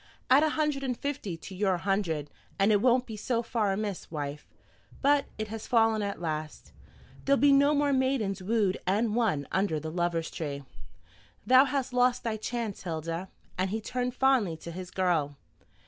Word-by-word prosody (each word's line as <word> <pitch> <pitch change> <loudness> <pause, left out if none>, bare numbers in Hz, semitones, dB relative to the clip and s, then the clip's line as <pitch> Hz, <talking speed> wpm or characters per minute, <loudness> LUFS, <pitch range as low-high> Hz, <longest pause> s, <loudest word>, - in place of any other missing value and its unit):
Add 270 +3 +7
a 310 - +3
hundred 300 -2 0
and 255 -3 -2
fifty 265 -12 -4
to 190 - -10
your 190 -1 +1
hundred, 170 -6 -1 0.3
and 200 +2 +3
it 205 -1 +3
won't 250 +1 +3
be 225 - -7
so 230 +2 -1
far 225 -3 0
amiss, 200 -1 -3
wife. 145 -1 -5 0.5
But 285 0 +3
it 215 -1 -4
has 220 0 -6
fallen 225 -2 +3
at 200 -1 -3
last. 155 -2 -5 0.5
There'll 280 0 +3
be 285 0 +5
no 280 +2 +5
more 285 -1 +2
maidens 260 -8 0
wooed 205 -1 +1
and 210 +3 +1
won 200 - +1
under 190 -4 +1
the 155 +1 -6
Lovers' 170 -1 -1
Tree. 140 -3 -5 0.8
Thou 260 +2 +7
hast 270 -2 -2
lost 250 0 +2
thy 225 -3 -1
chance, 225 -2 -4
Hilda." 165 +1 -4 0.3
And 185 +1 +1
he 220 +3 -2
turned 250 +3 -3
fondly 255 -12 +2
to 170 - -8
his 180 +1 -7
girl. 165 -7 0
210 Hz, 180 wpm, -29 LUFS, 175-250 Hz, 0.8 s, Add